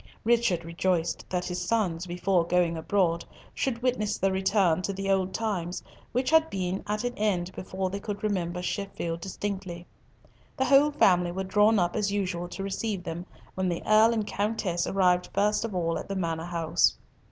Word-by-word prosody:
Richard 230 -7 +2
rejoiced 170 0 -1
that 180 -1 -1
his 180 0 -3
sons, 185 -6 0
before 180 0 +1
going 170 0 +1
abroad, 170 0 +1 0.3
should 245 -3 -2
witness 215 -5 0
the 195 - +1
return 190 -3 +2
to 195 - -2
the 195 0 -2
old 190 -1 +1
times 185 -6 -2 0.3
which 255 +3 0
had 320 0 +5
been 185 0 -2
at 210 +2 -1
an 245 0 -1
end 185 -4 0
before 185 0 -4
they 200 - -3
could 205 0 -5
remember 180 -4 -1
Sheffield 170 -4 -3
distinctly. 190 -2 -5 0.7
The 265 - +2
whole 275 +3 +6
family 180 -11 +3
were 190 +2 -3
drawn 210 +3 +4
up 175 -2 +1
as 210 -2 0
usual 185 -4 -2
to 195 +2 -6
receive 195 -1 -3
them, 175 +1 -5 0.3
when 185 -1 -1
the 170 - -3
Earl 215 +2 +6
and 220 -2 0
Countess 200 -5 -1
arrived 180 -2 +2
first 210 +2 +2
of 225 -4 -4
all 165 -2 0
at - - -8
the 195 - -3
Manor 165 -3 -2
house. 170 -2 +1
190 Hz, 180 wpm, -27 LUFS, 175-210 Hz, 0.7 s, whole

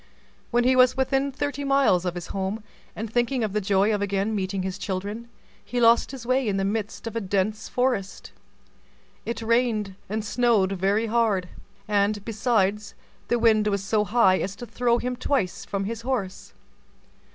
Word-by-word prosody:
When 240 0 +2
he 255 +1 +4
was 255 0 +5
within 270 +1 +1
thirty 285 +1 -3
miles 275 -10 +3
of 180 -1 -2
his 175 - -5
home, 195 +3 -3 0.3
and 220 - -4
thinking 240 +1 +1
of 210 -3 -2
the 210 - 0
joy 200 +2 +2
of 205 - -1
again 200 +2 -1
meeting 190 -2 -2
his 190 +1 -4
children, 205 +4 -4 0.4
he 245 - -3
lost 230 0 +5
his 260 -3 -8
way 255 0 +1
in 200 -2 0
the 195 - 0
midst 210 +2 -3
of 230 - -5
a 230 - -1
dense 205 +2 -1
forest. 245 -6 -1 1.0
It 235 0 -3
rained 225 -3 +1 0.2
and 215 +1 -2
snowed 225 -4 +2
very 195 +4 +1
hard, 215 -5 +1 0.4
and, 205 0 +1
besides, 210 -2 0 0.3
the 240 - +2
wind 220 -2 +3
was 200 -2 0
so 210 +1 +1
high 205 -3 +3
as 195 +1 -3
to 240 - -8
throw 240 0 +1
him 250 +1 -3
twice 245 -8 -1
from 200 0 -3
his 225 +2 -4
horse. 230 -7 -4
215 Hz, 175 wpm, -25 LUFS, 195-240 Hz, 1.0 s, was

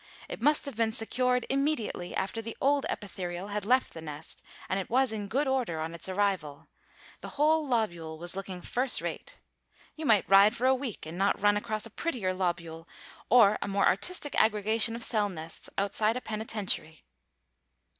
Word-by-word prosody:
It - - -7
must 295 +4 +3
have 280 -4 -6
been 225 0 +1
secured 250 +2 0
immediately 270 -10 -1
after 210 +4 -2
the 225 0 -7
old 280 0 +2
epitherial 185 -2 -5
had 205 -1 -3
left 255 +2 +2
the 160 - -8
nest, 150 0 -8 0.3
and 190 - -1
it 190 - -5
was 255 0 +2
in 210 -2 -4
good 270 +7 0
order 250 -12 0
on 160 +1 -4
its 170 +2 -7
arrival. 185 -7 -1 0.5
The - - -9
whole 310 +1 +3
lobule 175 -10 -1
was 175 +3 -5
looking 190 -2 -6
first 250 +1 0
rate. - - -6 0.6
You 315 -2 -4
might 215 -4 +4
ride 200 +3 +6
for 245 - -2
a 260 - +5
week 255 - -4
and 165 +3 -7
not 200 +1 +2
run 205 +1 +4
across 215 +1 -2
a 230 - -9
prettier 225 - -2
lobule 170 -3 -3 0.4
or 215 -3 +6
a - - -2
more 200 0 +1
artistic 295 - +1
aggregation 220 +1 +3
of 235 - -4
cell 210 -3 +1
nests 160 -3 -8
outside 210 +3 +1
a - - -5
penitentiary. 210 -8 -2
210 Hz, 180 wpm, -29 LUFS, 185-250 Hz, 0.6 s, ride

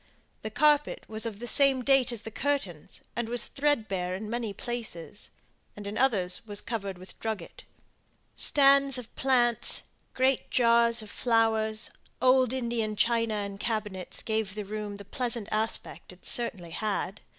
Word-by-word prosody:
The 220 - -4
carpet 295 +5 +2
was 220 +1 -1
of 215 -3 -6
the 240 - -7
same 270 0 +4
date 270 -2 +3
as 230 -2 -5
the 225 - -7
curtains, 220 - -3
and 235 0 -2
was 245 0 +1
thread 285 -6 0
bare 185 -2 -2
in 210 +3 -6
many 235 -3 -2
places; 210 -5 -6 0.5
and 205 - -8
in 200 +1 -5
others 195 -9 0
was 205 -2 -3
covered 200 -5 -4
with 185 +1 -11
drugget. 220 -6 -5 0.7
Stands 275 -1 +5
of 245 -2 -9
plants, 240 -4 +4 0.3
great 260 0 +1
jars 235 -1 +3
of 210 - -12
flowers, 220 -2 +1 0.3
old 255 -1 +4
Indian 235 -4 -2
china 230 0 +1
and 200 -1 -4
cabinets 210 -5 -3
gave 220 -3 -2
the 210 -1 -4
room 210 0 -5
the 200 - -11
pleasant 235 -1 -1
aspect 220 -2 -2
it 180 - -16
certainly 200 -8 0
had. 200 +1 -3
225 Hz, 155 wpm, -28 LUFS, 205-245 Hz, 0.7 s, Stands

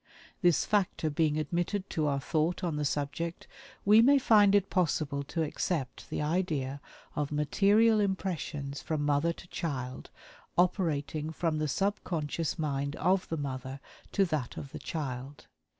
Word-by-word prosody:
This 175 -5 +4
factor 185 -6 +1
being 155 0 +1
admitted 175 +5 -1
to 155 -2 0
our 140 -1 +1
thought 160 +6 0
on 170 -4 0
the 150 0 -1
subject, 150 +4 -3 0.4
we 210 +2 +7
may 280 +4 +6
find 210 -6 +5
it 200 -1 +2
possible 155 -5 +1
to 160 +3 -1
accept 150 -3 -3
the - - -2
idea 150 -5 -1 0.3
of 150 -1 -1
material 205 +9 +4
impressions 170 -8 -2
from 155 -2 -2
mother 145 +3 +2
to 170 - -11
child 130 -6 -4 0.5
operating 160 -4 +1
from 160 -1 -1
the 155 - 0
subconscious 165 -3 -1
mind 140 -2 -2
of 185 +1 +1
the 165 - -2
mother 135 -1 -4 0.3
to 195 - +4
that 155 -7 -3
of 135 - -7
the - - -7
child. 135 -2 -5
155 Hz, 150 wpm, -30 LUFS, 145-185 Hz, 0.5 s, we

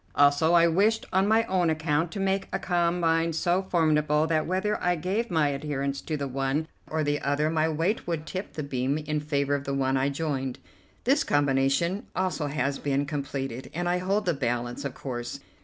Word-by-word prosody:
Also, 145 +3 +4
I 170 -1 +6
wished 205 +7 +2
on 190 +1 +3
my 220 +2 +4
own 185 -6 +1
account 160 +1 0
to 200 - -4
make 195 0 0
a - - 0
combine 170 -2 +1
so 175 +3 +1
formidable 155 -4 +2
that 155 -1 0
whether 190 +4 0
I 180 0 +3
gave 190 +8 -1
my 160 -5 +2
adherence 140 -1 -2
to 155 - -3
the 140 -1 -3
one 135 +4 -1 0.2
or 155 0 0
the 145 0 0
other 145 +2 +1
my 160 0 +2
weight 165 +8 -1
would 165 -2 -2
tip 185 +4 -5
the 155 - -4
beam 135 0 -1
in 150 0 -2
favour 145 -1 0
of 140 -1 -1
the 140 - -2
one 135 0 +1
I 135 +1 +2
joined. 140 -3 -2 0.5
This - - +3
combination 145 +6 +1
also 180 -5 -1
has 140 -1 -1
been 140 0 0
completed, 135 -3 -4
and 175 +1 -1
I 180 +1 +1
hold 195 +3 0
the 175 - +2
balance, 120 0 -2
of 140 - -4
course. 120 -3 -5
155 Hz, 195 wpm, -27 LUFS, 140-175 Hz, 0.5 s, I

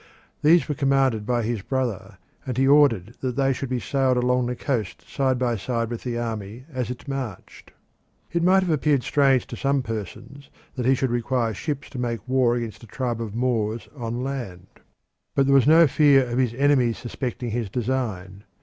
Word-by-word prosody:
These 165 +3 +5
were 150 - -1
commanded 135 -6 +1
by 120 -2 +1
his 115 -2 -2
brother, 105 -6 -3 0.3
and 125 -2 -4
he 135 +1 +3
ordered 125 -8 +4
that 125 -2 -2
they 135 0 +2
should 135 +1 -5
be 130 -1 -1
sailed 130 0 +1
along 125 0 +1
the 125 - -2
coast 120 -7 -3
side 130 -2 0
by 120 -2 0
side 115 +3 -2
with 120 - -4
the 120 -2 -3
army 115 0 -5
as 125 -2 -2
it 125 +2 -7
marched. 135 -8 -6 0.6
It 170 - 0
might 190 +2 +4
have 180 - -1
appeared 145 -3 +2
strange 135 -3 +3
to - - -8
some 140 +1 0
persons 115 +5 -7 0.2
that 125 -2 -2
he 135 - +5
should 130 -1 -1
require 120 -1 0
ships 145 +3 -4
to 130 - -6
make 120 0 -3
war 125 -2 +2
against 115 -3 -5
a - - -12
tribe 120 0 -3
of 110 -2 -5
Moors 115 -2 -1
on 120 -1 -4
land. 120 -10 -5 0.7
But 135 - +3
there 140 - +3
was 135 -1 +5
no 165 +2 +7
fear 140 -2 +4
of 120 +1 -2
his 120 -3 +1
enemies 130 -4 +2
suspecting 120 -1 -5
his 115 -2 -2
design. 105 -5 -3
125 Hz, 195 wpm, -24 LUFS, 115-135 Hz, 0.7 s, no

